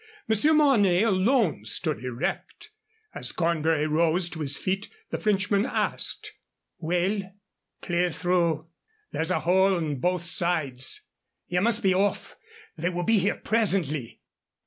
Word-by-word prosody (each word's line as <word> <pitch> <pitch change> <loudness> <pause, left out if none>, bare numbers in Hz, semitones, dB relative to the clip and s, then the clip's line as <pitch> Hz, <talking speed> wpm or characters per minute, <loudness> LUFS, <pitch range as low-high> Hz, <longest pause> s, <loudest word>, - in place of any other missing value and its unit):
Monsieur 220 +8 +3
Mornay 215 -11 +4
alone 210 - +2
stood 150 +7 -3
erect. 130 - -4 0.4
As - - -4
Cornbury 165 -2 0
rose 165 +3 +2
to 160 - -7
his 145 -2 +2
feet 195 +2 -2 0.2
the - - -2
Frenchman 200 -1 +1
asked: 265 - -2 0.5
"Well?" 180 +5 0 0.6
"Clear 175 0 +1
through. 170 -2 0 0.4
There's 160 +2 -2
a 185 - 0
hole 190 +2 +3
on 155 -5 -2
both 180 +3 0
sides. 155 -8 0 0.4
Ye 180 - 0
must 230 +3 +1
be 190 -1 +4
off. 200 +2 -1 0.4
They 175 - -1
will 175 0 -3
be 225 +2 +3
here 195 +2 +1
presently." 180 - -1
180 Hz, 130 wpm, -26 LUFS, 160-200 Hz, 0.6 s, Mornay